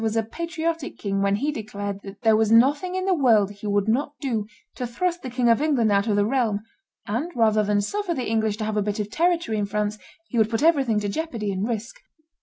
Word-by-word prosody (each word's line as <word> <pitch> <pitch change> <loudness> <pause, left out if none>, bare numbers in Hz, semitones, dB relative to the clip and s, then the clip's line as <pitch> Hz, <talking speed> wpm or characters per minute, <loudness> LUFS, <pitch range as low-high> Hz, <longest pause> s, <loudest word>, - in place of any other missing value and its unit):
was 220 -1 -1
a 225 - +2
patriotic 330 +4 -4
king 195 -1 -2
when 200 0 +2
he 285 +8 -1
declared 205 -4 -5
that 200 +3 -11
"there 220 -1 +5
was 220 0 +2
nothing 285 +10 +4
in 375 0 -1
the 385 - +3
world 225 - +3
he 205 +1 -8
would 205 0 +1
not 280 +6 0
do 225 -7 -2 0.3
to 250 - -4
thrust 350 +9 -2
the 260 - -5
King 245 0 0
of 230 +3 +4
England 265 -8 +2
out 200 +2 +2
of 210 - +2
the 205 0 +3
realm, 225 -4 +1 0.5
and, 250 +12 -2
rather 220 -2 +3
than 205 0 +1
suffer 390 - -2
the 255 - -2
English 220 -1 0
to 215 - -3
have 215 0 -2
a - - +3
bit 205 +1 -2
of 210 0 -3
territory 330 -8 +1
in 205 - 0
France, 210 +1 -2 0.3
he 240 - -1
would 220 -1 +3
put 225 +4 -1
everything 275 -10 +3
to 205 - -2
jeopardy 230 -4 -3
and 195 +2 -2
risk." 230 0 -4
225 Hz, 240 wpm, -24 LUFS, 210-280 Hz, 0.5 s, there